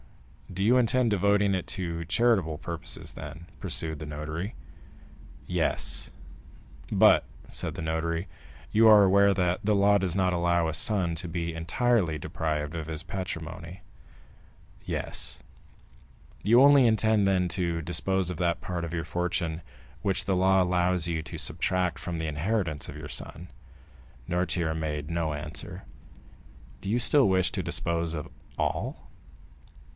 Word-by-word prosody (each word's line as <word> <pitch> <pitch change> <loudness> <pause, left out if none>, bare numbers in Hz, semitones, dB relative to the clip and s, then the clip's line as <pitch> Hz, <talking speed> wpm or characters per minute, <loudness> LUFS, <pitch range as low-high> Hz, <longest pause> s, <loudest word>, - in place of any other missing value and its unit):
"Do 95 +2 -2
you 120 +5 +5
intend 125 -1 +2
devoting 100 0 +3
it 95 -2 -1
to 85 -3 -3
charitable 95 -4 +2
purposes, 85 +1 -5
then?" 80 +3 -9
pursued 80 +3 -3
the 75 - -6
notary. 75 +6 -5 0.9
"Yes." - - -1 0.8
"But," - - +6 0.3
said - - -4
the - - -5
notary, 85 +3 -2 0.4
"you 110 +1 +5
are 105 -2 +8
aware 100 +1 +5
that 90 -1 +1
the 105 0 +2
law 100 +1 +4
does 90 -2 -1
not 95 -2 +2
allow 85 -1 +2
a 80 - -2
son 90 0 +1
to 85 +2 -6
be 85 0 -3
entirely 85 +1 +1
deprived 75 0 -3
of 80 -2 -4
his 80 -1 -4
patrimony?" 85 -1 -6 1.0
"Yes." - - -3 1.0
"You 120 +4 +6
only 140 -2 +7
intend, 110 -2 +3
then, 90 -2 +2
to 85 -2 -1
dispose 90 +3 0
of 90 - -6
that 85 -1 0
part 90 -2 -4
of 85 0 -5
your 85 -1 -2
fortune 85 -1 -2 0.4
which 95 -2 0
the 95 - +1
law 95 +1 +4
allows 90 -1 +1
you 80 -2 -1
to - - -8
subtract 90 -3 0
from 85 +1 -4
the 80 -1 -3
inheritance 80 +1 -2
of - - -8
your - - -7
son?" 85 +3 -6 0.8
Noirtier 85 -2 0
made 75 -1 -3
no 85 -2 -1
answer. 75 +1 -6 1.0
"Do 100 - -5
you 120 +4 +2
still 130 -1 +4
wish 95 -2 +2
to - - -1
dispose 85 -1 -1
of 75 - -5 0.3
all?" - - -2
90 Hz, 145 wpm, -28 LUFS, 80-100 Hz, 1.0 s, are